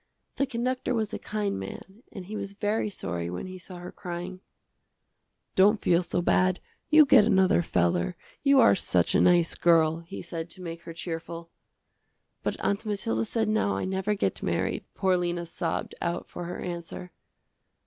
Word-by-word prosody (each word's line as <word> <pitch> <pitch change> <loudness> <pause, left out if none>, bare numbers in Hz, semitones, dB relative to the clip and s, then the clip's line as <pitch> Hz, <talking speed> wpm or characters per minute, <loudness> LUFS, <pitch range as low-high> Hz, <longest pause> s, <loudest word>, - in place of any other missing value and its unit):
The 275 - +1
conductor 255 0 -1
was 220 -2 -1
a - - -3
kind 210 - -2
man 190 - -9
and 190 -3 -8
he 210 +4 -7
was 200 -1 -4
very 210 +1 -1
sorry 85 - -4
when 90 - -5
he 185 0 -8
saw 185 +1 -10
her 175 +1 -8
crying. 180 0 -6 1.1
"Don't 205 +3 +5
feel 175 -3 +3
so 175 0 -2
bad, 185 +1 +3 0.3
you 310 0 +8
get 265 -5 +7
another 190 -4 +4
feller, 85 - +1 0.3
you 280 -1 +5
are 170 - +7
such 90 -3 +2
a - - +4
nice 175 -2 +4
girl," 165 -1 +3
he 170 0 -8
said 170 -1 -5
to 185 - -8
make 170 -1 -6
her 165 - -7
cheerful. 165 0 -6 0.9
"But - - -2
Aunt 200 +2 0
Mathilda 115 - -1
said 220 - 0
now, 215 -1 +1
I - - -2
never 190 +2 -1
get 200 - -1
married," - - -1
poor 190 -2 +2
Lena 175 -1 -2
sobbed 170 0 -3
out 170 0 -2
for 175 - -7
her 175 - -5
answer. 175 +1 -6
180 Hz, 175 wpm, -27 LUFS, 170-205 Hz, 1.1 s, you